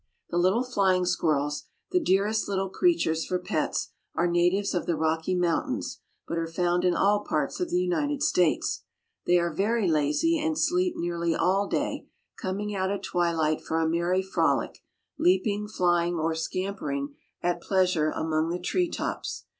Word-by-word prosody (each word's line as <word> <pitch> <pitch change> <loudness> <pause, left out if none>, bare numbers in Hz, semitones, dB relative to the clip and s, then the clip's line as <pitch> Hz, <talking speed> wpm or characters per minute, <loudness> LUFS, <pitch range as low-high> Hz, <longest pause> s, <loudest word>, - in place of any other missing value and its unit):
The 175 - +1
little 190 +7 +3
flying 190 -7 +2
squirrels, 150 -4 0 0.3
the 360 - +3
dearest 210 - +1
little 195 -1 -1
creatures 185 - +2
for 185 - -1
pets, 180 - -2 0.2
are 170 - +2
natives 175 +3 +2
of 175 - -2
the 170 - +1
Rocky 160 +3 0
Mountains, 175 -2 -1 0.3
but 170 - -2
are 165 - -2
found 175 +1 0
in 180 -1 +3
all 205 +3 +3
parts - - -1
of 360 -2 -1
the 350 - +1
United 300 -6 0
States. 180 - +2 0.5
They 175 - +5
are 170 -2 0
very 210 +4 +1
lazy, 160 - +2
and 310 0 -1
sleep 360 +3 +1
nearly 170 -1 -1
all 195 +4 +2
day, - - -2 0.3
coming 205 +2 -3
out 190 -1 -1
at 200 0 -3
twilight 165 -4 0
for 160 - -1
a 160 - +1
merry 170 +3 +1
frolic, 190 - 0 0.4
leaping, 200 +3 +2
flying, 175 -3 +1
or 165 0 0
scampering 160 -4 -3 0.3
at 175 0 0
pleasure 180 -5 +2
among 160 +1 -1
the 175 - -1
tree 335 - 0
tops. - - -4
180 Hz, 160 wpm, -27 LUFS, 165-205 Hz, 0.5 s, They